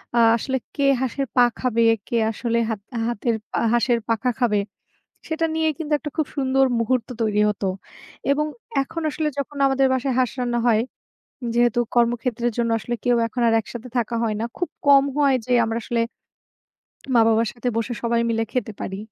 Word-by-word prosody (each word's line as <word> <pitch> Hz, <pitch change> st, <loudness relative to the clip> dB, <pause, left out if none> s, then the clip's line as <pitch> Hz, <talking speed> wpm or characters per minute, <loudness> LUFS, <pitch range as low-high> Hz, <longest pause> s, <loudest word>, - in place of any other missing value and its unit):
আ -, -, +4 dB, 0.2 s
আসলে 265 Hz, +3 st, -2 dB, 0.2 s
কে 280 Hz, -, -1 dB, 0.2 s
হাঁসের 265 Hz, +2 st, -1 dB
পা 245 Hz, -, +6 dB, 0.2 s
খাবে, 235 Hz, -2 st, +1 dB, 0.3 s
কে -, -, -3 dB, 0.2 s
আসলে 235 Hz, +1 st, -1 dB
হাত 220 Hz, -3 st, -2 dB, 0.3 s
হাতের 235 Hz, 0 st, -1 dB, 0.2 s
পা -, -, -2 dB, 0.2 s
হাঁসের 240 Hz, 0 st, +2 dB
পাখা 230 Hz, +2 st, +1 dB
খাবে, 215 Hz, -4 st, +2 dB, 0.7 s
সেটা 320 Hz, +1 st, -1 dB
নিয়ে 320 Hz, 0 st, +1 dB
কিন্তু 305 Hz, -2 st, -4 dB
একটা 295 Hz, 0 st, -6 dB
খুব 310 Hz, -, +1 dB
সুন্দর 270 Hz, -1 st, +3 dB
মুহূর্ত 245 Hz, +1 st, 0 dB
তৈরি 210 Hz, -2 st, +1 dB
হতো 205 Hz, -1 st, -2 dB, 0.6 s
এবং 300 Hz, +2 st, +2 dB, 0.4 s
এখন 325 Hz, +4 st, -6 dB
আসলে 305 Hz, 0 st, -1 dB
যখন 280 Hz, +1 st, -4 dB
আমাদের 270 Hz, 0 st, +3 dB
বাসায় 260 Hz, +1 st, 0 dB
হাঁস 255 Hz, -2 st, +2 dB
রান্না 240 Hz, -1 st, 0 dB
হয়, 220 Hz, -2 st, +4 dB, 0.7 s
যেহেতু 240 Hz, 0 st, +3 dB, 0.2 s
কর্মক্ষেত্রের 240 Hz, 0 st, +1 dB
জন্য 235 Hz, -1 st, +1 dB
আসলে 240 Hz, +2 st, -4 dB
কেউ 245 Hz, -1 st, +3 dB
এখন 240 Hz, +2 st, -3 dB
আর 225 Hz, -, +3 dB
একসাথে 240 Hz, +3 st, -9 dB
থাকা 235 Hz, -1 st, 0 dB
হয় 220 Hz, -2 st, 0 dB
না। -, -, -1 dB
খুব 355 Hz, -, -2 dB, 0.2 s
কম 275 Hz, -1 st, +7 dB
হয় 280 Hz, -2 st, +4 dB
যে 250 Hz, -, -1 dB
আমরা 225 Hz, +1 st, -1 dB
আসলে 235 Hz, -1 st, -1 dB, 1.2 s
মা-বাবার 225 Hz, 0 st, +4 dB
সাথে 245 Hz, +1 st, -2 dB
বসে 230 Hz, +2 st, -1 dB
সবাই 235 Hz, 0 st, +2 dB
মিলে 225 Hz, 0 st, +1 dB
খেতে 250 Hz, -3 st, -2 dB
পারি। 190 Hz, -, -4 dB
240 Hz, 175 wpm, -23 LUFS, 230-270 Hz, 1.2 s, কম